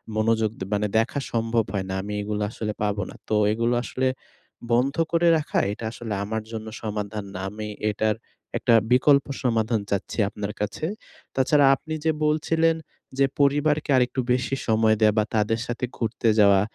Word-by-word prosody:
মনোযোগ 110 0 +2
দে - - -3
মানে 105 +1 +1
দেখা 125 +5 -1
সম্ভব 115 0 +1
হয় 95 -2 -1
না। - - -2
আমি 105 +2 -5
এগুলা 105 0 -2
আসলে 105 -2 -4
পাবো 105 -1 0
না। - - -10
তো 110 - +2 0.2
এগুলো 115 +2 +1
আসলে 130 +1 -1 0.6
বন্ধ 130 +4 +2 0.2
করে 170 0 +3
রাখা 150 - -1
এটা 110 +2 -6
আসলে 115 -2 -5
আমার 110 +1 -3
জন্য 110 -1 -6
সমাধান 105 -1 -4
না। 95 - -5
আমি 105 +1 -6 0.2
এটার 105 +1 0 0.4
একটা 120 - +2 0.2
বিকল্প 140 +2 +5 0.2
সমাধান 115 -2 +1
চাচ্ছি 100 - -2
আপনার 105 0 -5
কাছে। 105 +9 -2 0.5
তাছাড়া 140 +2 +4
আপনি 155 +3 -7
যে 160 - +4
বলছিলেন, 160 +2 +2 0.4
যে 135 - +6
পরিবারকে 145 +2 +2
আরেকটু 125 +1 +1
বেশি 125 +2 0
সময় 110 -1 +4
দেয়া 105 -1 +5
বা 105 - +3
তাদের 110 +2 +1
সাথে 120 +1 -2
ঘুরতে 115 0 -1
যাওয়া। 100 -2 +6
115 Hz, 170 wpm, -24 LUFS, 105-130 Hz, 0.6 s, যে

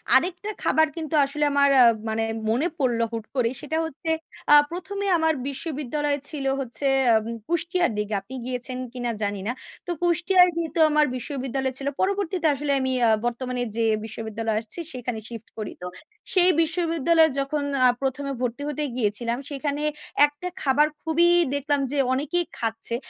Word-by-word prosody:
আরেকটা 365 +3 +1
খাবার 315 0 +3
কিন্তু 320 -2 -3
আসলে 295 +2 -2
আমার 280 0 +4
আ - - +9 0.3
মানে 220 0 0 0.3
মনে 250 +9 +1
পড়লো 240 -4 +1
হুট 225 -2 -5
করেই। 245 -2 +1
সেটা 315 +2 -2
হচ্ছে 320 +1 -6 0.4
আ - - +10 0.2
১ম 370 +3 -6
এ - - 0
আমার 320 -1 +2
বিশ্ববিদ্যালয় 290 0 -2
ছিল 290 -3 -5
হচ্ছে, 270 +1 -1 0.3
আম 220 -1 +1 0.2
কুষ্টিয়ার 345 -1 +1
দিকে। 210 0 -2
আপনি 235 +7 -10
গিয়েছেন 250 0 -1 0.2
কি 255 - -7
না 240 - 0
জানি 205 0 -2
না। - - +1 0.4
তো - - -1
কুষ্টিয়ার 350 +2 +4
যেহেতু 335 0 -3
আমার 300 0 +4
বিশ্ববিদ্যালয় 265 0 -3
ছিল। 275 0 -4
পরবর্তীতে 380 -3 0
আসলে 285 +1 -2
আমি 260 0 -1 0.2
আ - - +4 0.2
বর্তমানে 250 +1 -2
যে 230 0 +1 0.2
বিশ্ববিদ্যালয়ে 220 0 -3
আসছি 225 +9 -2
সেখানে 245 -3 -4
শিফট 230 -2 -8
করি। 215 -2 -4
তো 180 - -5 0.5
সেই 365 -1 +5
বিশ্ববিদ্যালয়ে 330 -1 +2
যখন 285 +2 -1 0.2
আ - - +8
১ম 270 +1 -2
এ - - -2
ভর্তি 245 +2 -2
হতে 295 0 -2
গিয়েছিলাম, 235 +1 0
সেখানে 285 0 -3 0.4
১ 295 - -5
টা 360 - -1
খাবার 290 +2 +4 0.2
খুবই 330 +2 +3 0.3
দেখলাম 285 0 0
যে, 290 - -2 0.2
অনেকেই 305 +6 0
খাচ্ছে। 225 0 -1
280 Hz, 170 wpm, -24 LUFS, 240-320 Hz, 0.5 s, আ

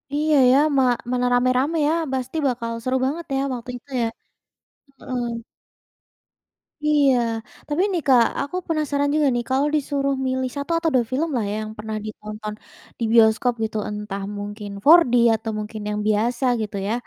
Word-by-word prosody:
Iya, 305 +1 +2 0.2
ya, 260 - +5 0.2
ma 265 - +5 0.3
mana 250 0 +1
ramai-ramai 255 +6 +2
ya. 310 - +2 0.2
Pasti 260 +4 -3
bakal 235 -2 -2
seru 255 +2 0
banget 320 +5 -3
ya - - +1
waktu 245 0 -7
itu 245 - -22
ya, 230 - +1 0.9
heeh. 250 -1 -4 1.6
Iya. 290 -3 +4 0.5
Tapi 300 +4 0
nih 350 -3 -1
Kak, 250 -3 +6 0.2
aku 285 +5 -5
penasaran 290 -3 0
juga 305 -2 +3
nih, 240 - -1
kalau 270 +3 +2
disuruh 275 -1 0
milih 260 0 -1
1 285 +3 -4
atau 330 -1 +1
2 245 -2 +3
film 305 +6 0
lah 230 - 0
ya, - - -2
yang 215 0 -6
pernah 215 +1 -5
ditonton 215 0 -7 0.5
di - - -2
bioskop 225 +2 +5
gitu, 220 0 -2
entah 210 -1 -5
mungkin 205 +1 -6 0.2
4D 320 -4 +7 0.2
atau 220 0 -4
mungkin 215 +1 -6
yang 210 0 -2
biasa 235 +5 +1 0.2
gitu 210 -1 -4
ya. 215 - 0
255 Hz, 165 wpm, -22 LUFS, 220-285 Hz, 1.6 s, 4D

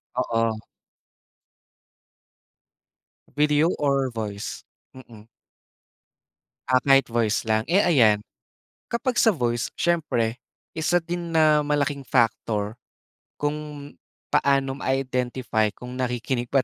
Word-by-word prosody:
Oo. 115 -3 0 2.8
Video 150 +2 +3
or 140 -2 +1
voice? 105 -4 -5 0.3
Mm. 115 -4 -14 1.4
Ah, 130 - +5
kahit 135 -2 +4
voice 115 -2 +1
lang. 110 0 +1
Eh, 190 +4 +3
ayan, 115 - +4 0.7
kapag 245 +2 -1
sa 225 - +5
voice, 120 - -1
siyempre 130 -9 0 0.3
isa 160 +2 +1
din 170 0 -5
na 155 -2 +4
malaking 145 -1 -1
factor 110 -3 0 0.6
kung 145 -1 -4 0.4
paano 135 -1 +1
ma-identify 125 -4 -1
kung 125 0 -9
nakikinig 125 0 -2
ba 135 -2 +3
130 Hz, 95 wpm, -24 LUFS, 115-150 Hz, 2.8 s, Ah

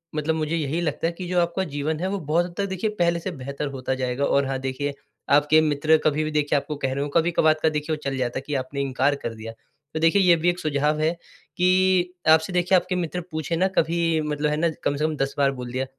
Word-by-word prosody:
मतलब 155 +1 0
मुझे 155 +1 -1
यही 155 0 -1
लगता 165 0 -1
है 170 - -3
कि 180 +1 -7
जो 180 -1 +2
आपका 170 +2 -1
जीवन 155 +2 -2
है 185 - 0
वो 200 0 -2
बहुत 165 +3 +1
हद 175 - -13
तक 200 - 0
देखिए 190 +3 -1
पहले 170 0 +2
से 185 +2 -4
बेहतर 140 0 -5
होता 130 -1 -3
जाएगा। 130 +1 -1
और 140 -1 +2
हाँ 135 -1 -2
देखिए, 135 +2 -3 0.4
आपके 150 +2 +5
मित्र 155 +1 +3
कभी-भी 155 +1 +1
देखिए 150 -1 +1
आपको 150 +2 -3
कह 135 -2 -2
रहे 140 - -2
हों, 145 - -4
कभी-कभार 165 0 +3
का 160 - +5
देखिए 150 +1 -2
वो - - -9
चल 135 -1 -2
जाता 125 -1 -2
है 135 - -11
कि 150 - -3
आपने 135 +2 -3
इनकार 135 +1 +1
कर 115 - -3
दिया। 110 +1 -8 0.4
तो 160 - -2
देखिए 165 +5 +4
ये 175 -2 +6
भी 170 +2 +1
एक 175 +1 -1
सुझाव 150 0 0
है 155 +1 +2 0.5
कि 185 0 +3 0.2
आपसे 160 +3 +4
देखिए 180 +1 +3
आपके 185 0 +1
मित्र 180 0 -2
पूछें 155 +1 -2
ना 185 - +3
कभी 165 -1 +2
मतलब 150 0 -1
है 150 - 0
ना 170 +1 +2
कम 145 - +1
से 150 - -2
कम 155 - -1
10 135 0 -1
बार 140 -1 +3
बोल 125 -2 -7
दिया। 130 +1 -2
155 Hz, 255 wpm, -24 LUFS, 140-170 Hz, 0.5 s, ये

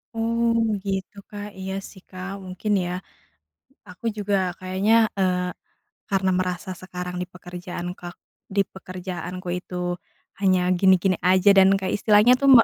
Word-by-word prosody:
Oh 230 +1 +1 0.2
begitu, 195 -1 -3
Kak, 205 0 -6
iya 190 0 -4 0.2
sih, 190 - -15
Kak, 185 +1 -6
mungkin 185 +3 -3
ya. 175 - -3 1.0
Aku 185 +5 -8
juga 205 -1 -1 0.2
kayaknya, 190 +4 +1 0.2
eee, 180 -1 +1 0.6
karena 190 -1 +2
merasa 180 +1 -2
sekarang 180 -1 -6
dipekerjaan 180 -1 -7
ka 175 0 -7 0.4
dipekerjaanku 185 -2 -4
itu 180 - -10 0.6
hanya 185 -2 +4 0.2
gini-gini 190 0 +4
aja 185 +2 +5
dan 190 0 +8
kayak 190 -1 -2
istilahnya 210 +3 +6
tuh 275 - +3
me 230 - +9
190 Hz, 130 wpm, -24 LUFS, 180-200 Hz, 1.0 s, me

